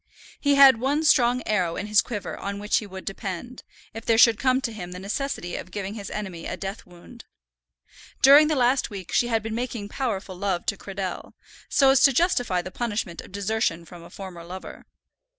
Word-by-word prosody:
He 285 -1 +2
had 270 -4 +8
one 285 +5 0
strong 250 -5 +4
arrow 180 -6 0
in - - -4
his 210 0 +4
quiver 205 -6 -5
on 200 0 -5
which 210 +1 0
he 215 - -3
would 190 -1 -9
depend, 195 +5 -6 0.3
if 225 - -7
there 225 - +2
should 230 -1 +6
come 255 +1 +2
to 235 -4 -3
him 180 -4 -7
the 180 - -7
necessity 200 -2 -4
of - - -7
giving 195 +1 -5
his 205 -3 -7
enemy 190 -6 -6
a 185 - -5
death 195 +3 -6
wound. 180 +7 -15 1.0
During 285 +3 +8
the 310 - +1
last 255 0 +2
week 195 -5 -8
she 240 - +2
had 225 -2 0
been 220 0 -4
making 230 -3 -4
powerful 210 -7 -3
love 185 -1 -2
to - - 0
Cradell, 195 -2 -6 0.3
so 270 -1 +5
as 270 - +4
to 275 - +6
justify 245 - +1
the 185 - -8
punishment 210 -7 -3
of - - -15
desertion 200 -4 -1
from 175 +1 -12
a 170 - -13
former 185 -3 -9
lover. 185 +2 -10
210 Hz, 205 wpm, -25 LUFS, 190-245 Hz, 1.0 s, had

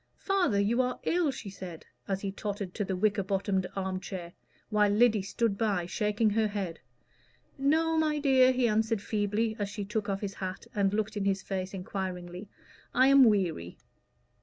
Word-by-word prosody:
"Father, 360 - +1
you 225 +5 +2
are 250 0 -2
ill," 345 -3 +2
she 230 -6 -6
said, 180 -4 -9 0.2
as 195 -1 -2
he 195 - -3
tottered 200 -2 -5
to 210 - -2
the 190 -1 -2
wicker 205 +1 +1
bottomed 190 -1 -1
arm 190 -1 -2
chair, 180 -2 -7 0.4
while 210 -1 +3
Lyddy 215 0 +4
stood 200 +1 -1
by, 200 -6 +1
shaking 210 +4 +1
her 220 +1 +2
head. 195 -5 -4 0.8
"No, 320 +3 +2
my 305 -1 +1
dear," 265 -3 +5
he 255 -1 +2
answered 220 0 +1
feebly, 215 +1 0
as 205 -1 -1
she 205 0 -5
took 210 0 -2
off 195 0 -2
his 200 -2 -3
hat 185 -1 -6
and 200 -2 +2
looked 215 +1 -2
in 200 - -1
his 195 0 0
face 190 -1 -3
enquiringly; 185 0 -5 0.5
"I 260 +2 +6
am 275 -1 +8
weary." 180 - +1
205 Hz, 180 wpm, -29 LUFS, 190-230 Hz, 0.8 s, am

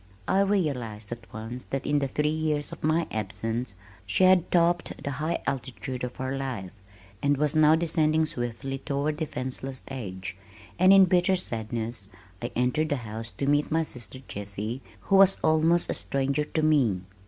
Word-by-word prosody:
I 190 - +3
realized 135 - 0
at 120 0 -8
once 115 +3 -6
that 135 0 -3
in 145 - +2
the 140 - 0
three 150 +3 0
years 155 -2 -1
of - - -10
my 160 +2 +2
absence 115 0 -3 0.3
she 185 - +2
had 185 -2 +5
topped 175 0 +2
the 140 - -2
high 165 +2 -1
altitude 130 -1 -4
of 125 -1 -4
her 130 +1 -3
life 125 -9 -4 0.5
and 145 0 +2
was 150 +1 +1
now 155 0 +6
descending 160 -1 +2
swiftly 130 0 -4
toward 145 +2 -1
defenseless 130 -3 -4
age, 95 -9 -5 0.4
and 185 +1 +7
in 195 -1 +8
bitter 185 +1 +3
sadness 115 - -4 0.3
I 120 - -3
entered 125 +6 +1
the 145 - +2
house 110 +1 -6
to 140 - -1
meet 145 +1 +2
my 165 +1 +2
sister 125 -3 -8
Jessie 105 +5 -5 0.2
who 195 - +3
was 195 0 +7
almost 160 +2 +3
a - - -1
stranger 140 +2 0
to 155 +1 -1
me. 130 -12 +3
140 Hz, 170 wpm, -27 LUFS, 120-160 Hz, 0.5 s, in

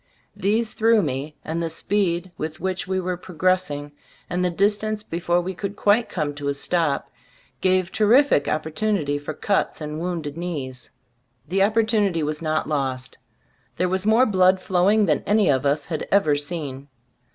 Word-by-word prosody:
These 210 +3 0
threw 225 -1 +3
me, 140 +4 -3
and 165 +1 -2
the 165 - -1
speed 180 0 0
with 155 0 -5
which 185 0 -2
we 190 0 0
were 180 -1 -2
progressing, 180 -5 -1 0.4
and 180 +1 0
the 180 - +2
dis 200 +4 +2
tance 215 -1 -3
before 175 0 0
we 185 +2 -4
could 200 +2 -5
quite 215 +3 +2
come 150 -4 -2
to 145 0 -5
a 140 - 0
stop, 160 0 0 0.5
gave 185 -1 +2
terrific 220 - +4
opportunity 155 -1 -1
for 145 +1 -6
cuts 200 +5 0
and 150 0 -5
wounded 165 -4 -4
knees. 140 -8 -5 0.6
The 185 +5 0
oppor 215 +3 +3
tunity 205 -7 +1
was 150 +1 -2
not 155 -1 -1
lost. 135 -4 -3 0.6
There 180 - +1
was 190 +1 -1
more 225 +4 +5
blood 185 -3 +4
flowing 195 +4 +3
than 150 -6 +1
any 205 -5 +4
of 135 +1 +1
us 145 0 0
had 155 0 -4
ever 155 -7 +4
seen. 145 -3 -4
175 Hz, 170 wpm, -23 LUFS, 150-200 Hz, 0.6 s, more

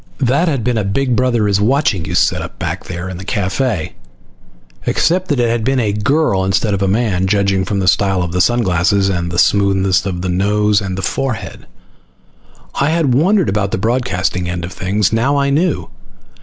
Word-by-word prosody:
That 140 +6 +1
had 140 -8 -1
been 120 -1 0
a - - -1
Big 120 +6 0
Brother 120 -3 +1
is 100 0 +1
Watching 110 - +1
you - - -4
setup - - 0
back - - -4
there 85 +2 -6
in 95 -1 -6
the 95 - -8
cafe, 100 - -2 0.9
except 185 +2 +1
that 145 -6 0
it 120 - +2
had 115 -1 -1
been 135 +2 +1
a 105 -4 0
girl 105 -2 +1
instead 95 +3 0
of 100 - -2
a 100 - +1
man, 95 -3 0
judging 100 -1 +1
from 100 - -2
the 95 -1 -1
style 95 -1 +2
of 90 +1 -1
sun 120 +4 +1
glasses 95 +2 +1
and 90 -2 -2
the 85 - -4
smoothness 95 +2 +2
of 90 -2 -4
the - - -2
nose 105 +3 +1
and 95 -1 -4
forehead. 130 -5 -4 1.1
I 140 - +2
had 160 -5 +1
wondered 185 - +2
about 100 0 0
the - - -2
broadcasting 95 -5 -1
end 90 -1 -3
of 90 - -8
things. 100 +2 0
Now 130 +6 +1
I 140 0 +1
knew. 160 +3 0
100 Hz, 195 wpm, -16 LUFS, 95-125 Hz, 1.1 s, it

